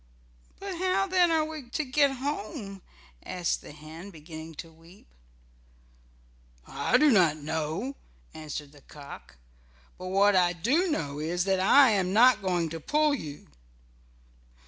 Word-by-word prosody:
"But 390 -3 -6
how 375 +1 +1
then 365 -2 +3
are 320 -1 +2
we 310 -5 -8
to 305 +4 -2
get 280 +2 +3
home?" 220 -7 -5 0.4
asked 180 -3 -2
the - - -11
hen, 155 +5 -11
beginning 160 -1 -10
to 165 +2 -9
weep. 165 +4 -19 1.6
"I 140 - +1
do 300 +1 +5
not 175 -8 +4
know," 160 - -3 0.4
answered 150 -2 -7
the 145 -1 -18
cock. 140 - -12 0.6
"But 185 - -6
what 195 +2 +3
I 175 -1 +3
do 275 - +1
know 145 - -3
is 170 +3 -1
that 190 0 +1
I 250 +7 +6
am 190 -3 0
not 245 +1 +6
going 175 -4 0
to 165 +1 -6
pull 300 - +1
you." 150 - -6
190 Hz, 145 wpm, -28 LUFS, -, 1.6 s, I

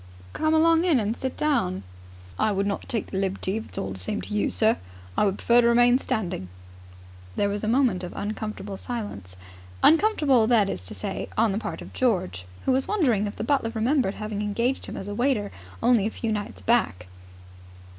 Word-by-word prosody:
"Come 310 0 +1
along 330 +1 +4
in 335 -8 +3
and 215 +1 -1
sit 260 +1 -4
down." 95 - 0 0.6
"I 215 - +2
would 200 0 0
not 200 0 -3
take 225 -4 -2
the 190 - -1
liberty, 195 +1 -1
if 225 - -5
it - - -16
is - - -7
all 95 - -3
the 95 - 0
same 150 - -1
to - - -7
you, 210 - +1
sir. 220 0 +2 0.4
I - - +3
would 195 0 0
prefer 240 +1 +4
to 235 - +3
remain 245 +1 +5
standing." 175 - -3 0.9
There 205 - +1
was 205 +1 -3
a - - -1
moment 230 -6 +2
of 175 - -5
uncomfortable 210 -1 -4
silence. 205 - -6 0.5
Uncomfortable, 300 - +4
that 220 -5 +3
is 90 - -5
to - - -8
say, 95 - -4
on 220 -1 +3
the 200 - -1
part - - -5
of - - -12
George, 175 - 0 0.2
who - - +3
was 265 +1 +1
wondering 250 - +2
if 205 - -6
the - - -4
butler 230 -2 +1
remembered 235 -2 +1
having 215 -1 -4
engaged 235 +5 -1
him - - -6
as 195 - -6
a 205 - -4
waiter 235 -3 0 0.3
only 230 -5 +4
a - - -1
few 225 0 -3
nights 210 -1 -4
back. 225 - +1
220 Hz, 205 wpm, -25 LUFS, 200-245 Hz, 0.9 s, remain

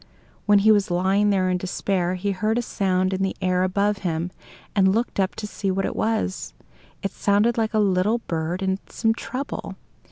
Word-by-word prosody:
While 205 0 +6
he 210 +2 +5
was 205 -2 +3
lying 190 +4 +2
there 190 -2 +2
in 180 - 0
despair, 185 0 -1
he 200 +2 -1
heard 215 +4 0
a 240 - 0
sound 185 -3 0
in 190 - -2
the 190 0 0
air 185 -1 +1
above 200 +2 +1
him, 175 -1 -2 0.4
and 190 -1 +4
looked 230 -2 -1
up 190 0 +1
to 210 - -5
see 205 -1 -3
what 195 +1 0
it - - -3
was. 220 -4 -1 0.5
It 195 - -1
sounded 210 +3 +2
like 220 -1 -1
a - - +3
little 205 +2 +2
bird 170 -3 -3
in 190 0 0
some 225 -1 +1
trouble. 255 +4 -5
195 Hz, 195 wpm, -23 LUFS, 185-210 Hz, 0.5 s, While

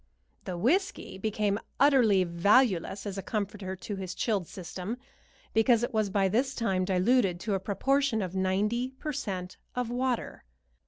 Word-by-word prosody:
The 180 - -4
whiskey 280 - 0
became 210 0 0 0.2
utterly 245 -9 +5
valueless 195 +2 +2
as 200 -1 -4
a - - -3
comforter 200 -1 -3
to 200 +2 -6
his 185 -2 -5
chilled 200 -7 0
system, 185 +4 -6 0.6
because 230 +1 +4
it 245 +1 -2
was 215 -2 +1
by 195 0 +2
this 255 +8 0
time 190 -5 0
diluted 190 0 +2
to 210 - -1
a 195 - +1
proportion 235 +4 +1
of 185 0 -5
ninety 205 +6 0
per 300 +2 -4
cent 185 -6 -4 0.2
of 250 -2 -2
water. 250 -1 -2
205 Hz, 155 wpm, -29 LUFS, 190-240 Hz, 0.6 s, utterly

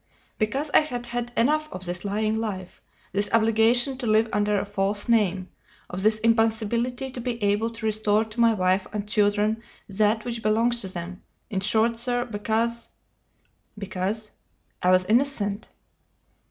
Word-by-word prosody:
"Because 270 +7 -1
I - - +8
had 245 -6 -4
had 240 0 -3
enough 305 +5 +2
of 185 0 -7
this 175 0 -3
lying 215 +2 -1
life, 195 -5 -5 0.3
this 205 +1 +2
obligation 230 +3 +3
to 245 - -3
live 220 +1 +3
under 210 0 +1
a - - -3
false 205 +1 -1
name, 195 -5 +1 0.4
of 180 +1 -3
this 215 +2 +3
impossibility 230 +3 0
to 250 - -6
be 235 -2 -4
able 205 +3 +1
to 230 -1 -7
restore 215 0 +1
to 220 +2 -10
my 230 -1 +5
wife 185 0 +1
and 210 -1 -4
children 210 +1 +1 0.3
that 215 +2 +1
which 235 -2 -4
belongs 230 +3 +1
to 190 - -5
them; 185 0 -7 0.3
in 195 - 0
short, 220 +3 +1
sir, 245 0 -1
because 230 +1 -2 0.4
" - - -43
"Because?" 205 +2 -3 0.5
"I 180 - +2
was 185 0 +4
innocent!" 220 -2 +1
220 Hz, 160 wpm, -25 LUFS, 205-235 Hz, 0.5 s, I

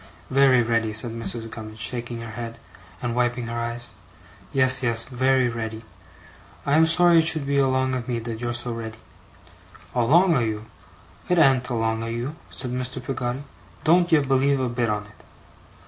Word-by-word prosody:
'Very 130 -2 +5
ready,' 115 -1 0
said 110 +2 +1
Mrs. 115 0 0
Gummidge, 110 -1 -8
shaking 120 0 -4
her 115 -1 -7
head, 115 0 -6 0.5
and 120 -1 -2
wiping 120 0 0
her 115 0 -3
eyes. 120 +1 -4 0.6
'Yes, 130 -1 +3
yes, 115 -2 0
very 130 +1 +2
ready. 115 -1 -5 0.8
I 140 - +1
am 160 +1 +5
sorry 170 0 +5
it 160 - +2
should 155 -3 +3
be 140 0 +1
along 130 -1 +1
of 125 -2 -3
me 120 -2 -1
that 115 0 -5
you're 120 0 -2
so 120 0 -2
ready.' 110 -1 -6 1.0
'Along 160 +9 +4
o' - - +2
you! 110 -2 -2 0.6
It 180 - +3
an't 135 -5 +4
along 115 -2 -1
o' 115 - -4
you!' 120 +6 -4
said 125 -2 -3
Mr. 125 +1 -2
Peggotty. 130 0 -3 0.4
'Don't 175 +2 +4
ye 160 - +7
believe 135 0 +2
a 130 -1 0
bit 120 -1 -1
on 105 -1 -1
it. 105 - -19
120 Hz, 180 wpm, -24 LUFS, 115-135 Hz, 1.0 s, ye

